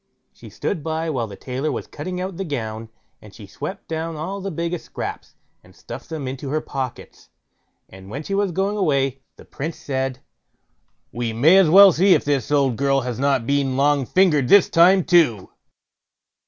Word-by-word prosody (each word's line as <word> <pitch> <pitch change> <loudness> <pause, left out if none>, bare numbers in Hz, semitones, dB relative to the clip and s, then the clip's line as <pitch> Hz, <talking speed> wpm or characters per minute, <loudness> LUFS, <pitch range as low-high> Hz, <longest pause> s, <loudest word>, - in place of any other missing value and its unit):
She - - -14
stood 165 -7 -4
by 160 0 -2
while 120 -6 -2
the 100 - -10
tailor 130 +7 -4
was - - -4
cutting 180 +5 -6
out 185 -1 -5
the 195 - -3
gown, 115 - -5 0.3
and 105 -1 -15
she 110 - -11
swept 145 - -8
down 165 0 -4
all 185 +6 -5
the 195 - -4
biggest 170 0 -4
scraps, - - -7 0.3
and 95 +1 -20
stuffed 120 +3 -10
them 155 -5 -5
into 135 +1 -6
her 155 +3 0
pockets; 135 -4 -7 0.6
and 95 0 -14
when 140 +8 -6
she 195 - -5
was 200 -1 0
going 195 +4 -1
away, 135 -7 0
the - - -16
Prince 155 +4 -6
said: 130 -2 -3 0.9
"We 120 -2 -3
may 145 +11 +5
as 190 -5 +5
well 195 +3 +9
see 185 +3 +4
if - - -1
this 140 -5 -1
old 135 -5 +2
girl 135 0 +1
has 125 -1 -5
not 135 -4 +1
been 140 -1 0
long 140 -2 +2
fingered 160 -8 +3
this 200 +4 +6
time 180 +3 +5
too." 150 - +2
145 Hz, 185 wpm, -21 LUFS, 130-170 Hz, 0.9 s, well